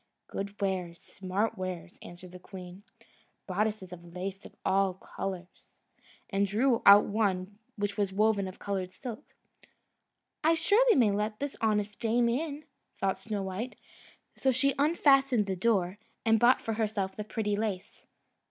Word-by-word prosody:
"Good 200 Hz, +1 st, -6 dB
wares, 185 Hz, -4 st, -2 dB
smart 195 Hz, +3 st, -3 dB
wares," 185 Hz, -2 st, -5 dB
answered 175 Hz, +1 st, -11 dB
the 180 Hz, -, -10 dB
queen 180 Hz, 0 st, -10 dB, 0.6 s
"bodice 210 Hz, +2 st, -1 dB, 0.2 s
laces 185 Hz, +3 st, -6 dB
of -, -, -21 dB
all 190 Hz, -1 st, +2 dB
colours;" 185 Hz, -1 st, -7 dB, 0.5 s
and 200 Hz, 0 st, +2 dB
drew 230 Hz, +4 st, +2 dB
out 200 Hz, +1 st, +10 dB
one 200 Hz, -1 st, -1 dB, 0.2 s
which 205 Hz, -1 st, -2 dB
was 200 Hz, -2 st, +1 dB
woven 205 Hz, 0 st, +2 dB
of 185 Hz, -, -9 dB
coloured 190 Hz, -2 st, -3 dB
silk. 245 Hz, +6 st, -7 dB, 1.2 s
"I 320 Hz, +2 st, +5 dB
may -, -, +2 dB
surely 330 Hz, -, +4 dB
let 210 Hz, +1 st, -2 dB
this 285 Hz, -1 st, -3 dB
honest 210 Hz, -2 st, 0 dB
dame 235 Hz, 0 st, +2 dB
in!" 295 Hz, +4 st, -2 dB, 0.3 s
thought 190 Hz, -1 st, 0 dB
Snowdrop; 200 Hz, +3 st, -4 dB, 0.6 s
so 265 Hz, -, +2 dB
she 270 Hz, +2 st, +2 dB
unfastened 275 Hz, -6 st, +4 dB
the 190 Hz, -1 st, -2 dB
door, 190 Hz, -1 st, +1 dB, 0.3 s
and 225 Hz, -1 st, +4 dB
bought 240 Hz, +3 st, +5 dB
for 225 Hz, -, -2 dB
herself 210 Hz, -3 st, -1 dB
the 210 Hz, -, -4 dB
pretty 210 Hz, -1 st, -1 dB
lace. 205 Hz, -3 st, -4 dB
205 Hz, 145 wpm, -30 LUFS, 190-230 Hz, 1.2 s, out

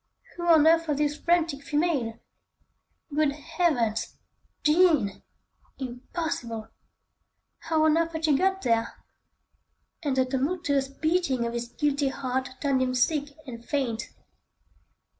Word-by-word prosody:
Who 345 Hz, 0 st, -4 dB
on 320 Hz, -3 st, +6 dB
earth 330 Hz, 0 st, +4 dB
was 295 Hz, -2 st, 0 dB
this 295 Hz, 0 st, +1 dB
frantic 330 Hz, -3 st, +1 dB
female? 290 Hz, -7 st, 0 dB, 1.0 s
Good 295 Hz, -1 st, +2 dB
Heavens! 280 Hz, -, -1 dB, 0.5 s
Jean! 300 Hz, -, +3 dB, 0.6 s
Impossible! 245 Hz, -3 st, -5 dB, 0.9 s
How 320 Hz, -1 st, +1 dB
on 315 Hz, +1 st, +4 dB
earth 335 Hz, 0 st, -1 dB
had 320 Hz, 0 st, -1 dB
she 300 Hz, -3 st, +4 dB
got 385 Hz, +5 st, +1 dB
there? 230 Hz, -1 st, +1 dB, 1.1 s
And 285 Hz, -5 st, -1 dB
the 260 Hz, -, +4 dB
tumultuous 275 Hz, +1 st, 0 dB
beating 275 Hz, -3 st, 0 dB
of 235 Hz, -, -3 dB
his 235 Hz, 0 st, -3 dB
guilty 285 Hz, +2 st, 0 dB
heart 260 Hz, -1 st, -2 dB
turned 275 Hz, -3 st, +1 dB
him 255 Hz, 0 st, 0 dB
sick 285 Hz, +3 st, +1 dB
and 235 Hz, -3 st, -8 dB
faint. 240 Hz, -4 st, -2 dB
285 Hz, 120 wpm, -27 LUFS, 255-320 Hz, 1.1 s, on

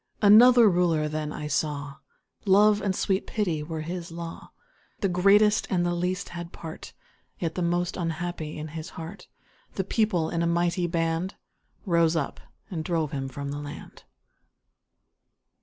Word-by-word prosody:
Another 235 Hz, +3 st, +8 dB
Ruler 175 Hz, -5 st, +2 dB
then 155 Hz, 0 st, -3 dB
I 150 Hz, -, -5 dB
saw 145 Hz, -2 st, -2 dB, 0.5 s
Love 205 Hz, +2 st, +5 dB
and 195 Hz, -2 st, 0 dB
sweet 190 Hz, +1 st, 0 dB
Pity 180 Hz, -8 st, -1 dB
were 160 Hz, +1 st, -5 dB
his 170 Hz, +1 st, -5 dB
law: 165 Hz, 0 st, -8 dB, 0.5 s
The 195 Hz, -, +2 dB
greatest 200 Hz, +4 st, +4 dB
and 175 Hz, -2 st, +1 dB
the 175 Hz, -, 0 dB
least 180 Hz, +1 st, -2 dB
had 175 Hz, 0 st, -7 dB
part 160 Hz, -1 st, -9 dB, 0.4 s
(Yet 165 Hz, -2 st, -3 dB
most 175 Hz, +1 st, 0 dB
the -, -, -5 dB
unhappy) 165 Hz, -1 st, -4 dB
in 155 Hz, +1 st, -6 dB
his 160 Hz, +3 st, -7 dB
heart 180 Hz, +3 st, -8 dB, 0.5 s
The 190 Hz, -, 0 dB
People, 195 Hz, -5 st, 0 dB
in 170 Hz, -, -1 dB
a 170 Hz, -, +1 dB
mighty 175 Hz, +1 st, +1 dB
band, 165 Hz, +2 st, -1 dB, 0.5 s
Rose 170 Hz, -3 st, +3 dB
up, 150 Hz, -4 st, -2 dB, 0.3 s
and 160 Hz, -4 st, -3 dB
drove 160 Hz, -3 st, -1 dB
him 135 Hz, -2 st, -3 dB
from 140 Hz, +1 st, -5 dB
the 145 Hz, -, -4 dB
land! 145 Hz, 0 st, -9 dB
170 Hz, 155 wpm, -26 LUFS, 155-185 Hz, 0.5 s, Another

